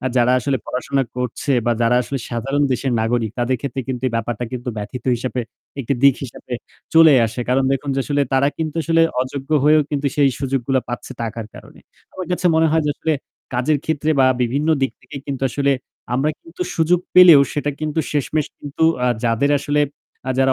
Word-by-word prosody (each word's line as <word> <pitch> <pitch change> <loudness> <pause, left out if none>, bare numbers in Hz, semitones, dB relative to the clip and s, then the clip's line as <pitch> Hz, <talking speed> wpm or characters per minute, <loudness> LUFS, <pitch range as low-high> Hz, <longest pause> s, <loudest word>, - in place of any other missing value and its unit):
অ্যা 130 - -1
যারা 125 +1 +4
আসলে 135 +1 0
পড়াশোনা 135 +2 -1
করছে 125 +3 -2
বা 120 - +3
যারা 120 +1 +3
আসলে 135 +4 -4
সাধারণ 135 +5 -1
দেশের 130 0 -1
নাগরিক 115 -1 0
তাদের 125 +1 +1
ক্ষেত্রে 135 -1 -3
কিন্তু 125 -1 -3
এই - - -10
ব্যাপারটা 120 +1 -3
কিন্তু 125 0 -5
ব্যথিত 120 +4 -6
হিসেবে 125 +1 -3 0.4
একটি 135 +2 -1
দিক 140 -1 +7
হিসেবে 125 0 -10 0.4
চলেই 160 -4 +7
আসে। 115 +3 -6
কারণ 130 +1 +2
দেখুন 135 +1 -2
যে 135 - 0
আসলে 145 -1 +1
তারা 135 +1 +3
কিন্তু 160 0 -3
আসলে 165 +1 +3 0.2
অযোগ্য 135 +2 -7
হয়েও 155 +1 +5
কিন্তু 145 -1 -1
সেই 140 -2 +4
সুযোগগুলা 135 -1 0
পাচ্ছে 120 - -6
টাকার 115 -1 -4
কারণে। - - -14 0.3
আমার 185 -2 -6
কাছে 180 +1 0
মনে 160 0 +4
হয় 160 0 +2
যে 145 - +2
আসলে 160 - -1 0.4
কাজের 140 +5 +1
ক্ষেত্রে 155 0 -1
বা 130 - +6 0.2
বিভিন্ন 140 +6 0
দিক 135 -4 +1
থেকে 125 +3 -11
কিন্তু 135 -1 -4
আসলে 140 +3 +1 0.4
আমরা 140 +4 +1
কিন্তু 340 +2 -6
সুযোগ 170 +2 +2
পেলেও 175 -6 +9
সেটা 145 0 -1
কিন্তু 155 +1 -1
শেষমেশ 150 +1 0
কিন্তু 145 +2 -5 0.2
আ - - +2 0.2
যাদের 115 +5 +2
আসলে 145 +1 0 0.5
আ - - 0
যারা 135 0 +4
135 Hz, 195 wpm, -20 LUFS, 125-150 Hz, 0.5 s, পেলেও